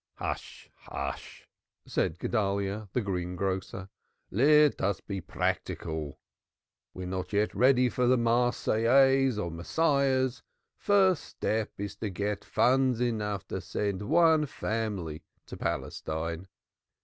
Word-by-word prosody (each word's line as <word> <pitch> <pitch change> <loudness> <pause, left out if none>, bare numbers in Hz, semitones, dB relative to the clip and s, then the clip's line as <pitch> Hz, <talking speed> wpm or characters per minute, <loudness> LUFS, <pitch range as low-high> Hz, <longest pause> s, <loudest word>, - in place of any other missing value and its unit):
"Hush, - - -6
hush!" - - -7 0.4
said 80 - -1
Guedalyah, 100 0 -1
the 125 - 0
greengrocer. 95 0 -3 0.4
"Let 150 +6 +4
us 95 -1 0
be 95 -2 -5
practical. 80 -1 -3 0.8
We 95 - -6
are - - -5
not 95 +1 -4
yet 105 +1 +1
ready 125 0 +4
for 125 +1 0
Marseillaises 125 +1 +3
or 85 -5 -2
Messiahs. 130 - +1 0.4
The - - -31
first 190 -5 +3
step 110 0 -2
is 100 0 -5
to 110 - -3
get 100 +2 -3
funds 130 -1 +2
enough 105 -4 -1
to - - -3
send 100 -2 -2
one 160 -2 +4
family 105 - -3 0.2
to - - -9
Palestine." 80 +3 -3
105 Hz, 115 wpm, -29 LUFS, 95-130 Hz, 0.8 s, Let